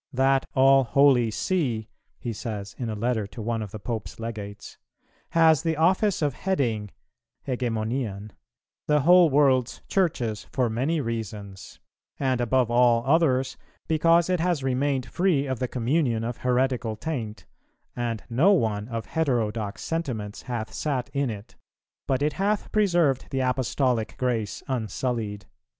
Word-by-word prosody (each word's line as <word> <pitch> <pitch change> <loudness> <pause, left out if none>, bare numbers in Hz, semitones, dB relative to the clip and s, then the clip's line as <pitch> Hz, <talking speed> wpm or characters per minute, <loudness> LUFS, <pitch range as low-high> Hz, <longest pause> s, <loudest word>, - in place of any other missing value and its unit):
"That 135 +1 +2
all 135 +1 +6
holy 130 -2 +4
See," 120 - -1 0.3
he 120 -3 -4
says 105 -3 -6
in 120 -3 -2
a 110 - -3
letter 110 -1 -1
to 115 - -12
one 115 +1 -2
of 105 - -5
the 110 - -7
Pope's 110 +1 -5
Legates, 105 -3 -7 0.5
"has 160 -3 +4
the 165 -2 -1
office 185 +3 +2
of 145 -2 +1
heading 120 - -1 0.6
(ἡγεμονίαν) 115 -4 -2 0.6
the 150 -1 +3
whole 175 +2 +6
world's 135 -3 +2
Churches 120 - -1
for 125 -3 0
many 140 +9 0
reasons; 105 -5 -6 0.4
and 130 -3 +1
above 120 0 +2
all 120 -1 +4
others, 135 -3 +2 0.3
because 165 +1 +4
it 180 -1 +1
has 170 -4 0
remained 135 0 0
free 150 - +1
of 130 -3 -3
the 130 - -1
communion 120 -1 0
of 120 +1 -3
heretical 125 -2 0
taint, 110 -4 -5 0.5
and 115 -2 -3
no 150 - +4
one 110 - 0
of 115 -3 -4
heterodox 115 -6 -1
sentiments 125 -11 -3
hath 120 -3 -5
sat 135 -5 -2
in 140 -2 0
it, 105 -2 -8 0.5
but 135 +1 +1
it 150 0 +1
hath 205 +2 -1
preserved 175 -10 +2
the 135 -1 -1
Apostolic 125 -2 0
grace 115 -5 -2
unsullied." 110 -4 -3
125 Hz, 140 wpm, -25 LUFS, 110-145 Hz, 0.6 s, all